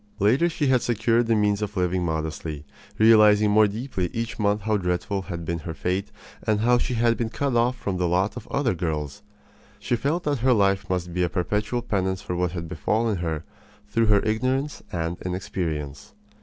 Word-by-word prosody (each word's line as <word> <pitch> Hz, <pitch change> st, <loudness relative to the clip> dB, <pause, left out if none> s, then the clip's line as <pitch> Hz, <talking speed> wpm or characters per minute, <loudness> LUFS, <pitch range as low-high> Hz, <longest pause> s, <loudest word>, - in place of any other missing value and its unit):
Later 125 Hz, -, +3 dB
she 155 Hz, -2 st, -1 dB
had 130 Hz, -2 st, +3 dB
secured 115 Hz, 0 st, +1 dB
the 115 Hz, -, +3 dB
means 105 Hz, -1 st, +1 dB
of 105 Hz, 0 st, -4 dB
living 90 Hz, 0 st, +1 dB
modestly, 80 Hz, -2 st, -3 dB, 0.3 s
realizing 105 Hz, -1 st, +6 dB
more 110 Hz, 0 st, +6 dB
deeply 105 Hz, -3 st, -3 dB
each 115 Hz, 0 st, -4 dB
month 105 Hz, 0 st, +1 dB
how 110 Hz, +1 st, 0 dB
dreadful 95 Hz, +1 st, -1 dB
had 85 Hz, -3 st, -6 dB
been 85 Hz, +1 st, -2 dB
her 80 Hz, +1 st, -6 dB
fate 95 Hz, +4 st, -2 dB, 0.3 s
and 105 Hz, -1 st, 0 dB
how 120 Hz, +2 st, +4 dB
she 125 Hz, -, -2 dB
had 115 Hz, 0 st, +2 dB
been 115 Hz, -2 st, -1 dB
cut 135 Hz, +2 st, -1 dB
off 120 Hz, +2 st, +2 dB
from 95 Hz, -2 st, -3 dB
the 90 Hz, -1 st, +1 dB
lot 95 Hz, +4 st, +1 dB
of -, -, -8 dB
other 140 Hz, -6 st, 0 dB
girls. 80 Hz, +1 st, -3 dB, 0.6 s
She 110 Hz, +4 st, -1 dB
felt 155 Hz, +8 st, -1 dB
that 145 Hz, -3 st, 0 dB
her 130 Hz, +2 st, +4 dB
life 100 Hz, -3 st, +2 dB
must 90 Hz, -2 st, -2 dB
be 90 Hz, -, -1 dB
a 90 Hz, -, +2 dB
perpetual 105 Hz, +6 st, -1 dB
penance 95 Hz, -3 st, -1 dB
for 90 Hz, -, -3 dB
what 90 Hz, -1 st, -1 dB
had 85 Hz, -2 st, -5 dB
befallen 105 Hz, +7 st, 0 dB
her 80 Hz, -3 st, -3 dB, 0.5 s
through 115 Hz, +2 st, +2 dB
her 105 Hz, -2 st, +5 dB
ignorance 130 Hz, +6 st, -1 dB
and 85 Hz, 0 st, -2 dB
inexperience. 85 Hz, -6 st, -4 dB
105 Hz, 195 wpm, -24 LUFS, 90-115 Hz, 0.6 s, realizing